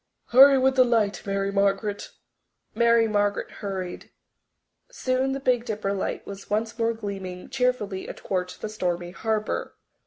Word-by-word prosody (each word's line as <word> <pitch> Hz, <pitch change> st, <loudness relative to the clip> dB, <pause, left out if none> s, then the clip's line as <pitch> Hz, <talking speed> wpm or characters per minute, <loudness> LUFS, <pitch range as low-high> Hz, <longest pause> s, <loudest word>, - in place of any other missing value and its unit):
Hurry 270 Hz, +3 st, +8 dB
with 265 Hz, 0 st, +2 dB
the 255 Hz, -, +8 dB
light, 220 Hz, -6 st, +1 dB
Mary 195 Hz, 0 st, -1 dB
Margaret." 200 Hz, +1 st, 0 dB, 0.6 s
Mary 235 Hz, 0 st, +4 dB
Margaret 205 Hz, -1 st, 0 dB
hurried. 190 Hz, -3 st, -5 dB, 0.8 s
Soon 265 Hz, -, -1 dB
the 275 Hz, -, -3 dB
Big 250 Hz, -3 st, +1 dB
Dipper 215 Hz, -4 st, -2 dB
light 195 Hz, -, -3 dB
was 200 Hz, 0 st, -9 dB
once 225 Hz, +2 st, -1 dB
more 230 Hz, 0 st, +2 dB
gleaming 195 Hz, -4 st, -6 dB
cheerfully 250 Hz, -7 st, -1 dB
athwart 180 Hz, -1 st, -4 dB
the -, -, -3 dB
stormy 175 Hz, -4 st, -2 dB
harbour. 215 Hz, +2 st, -2 dB
210 Hz, 135 wpm, -25 LUFS, 195-240 Hz, 0.8 s, Hurry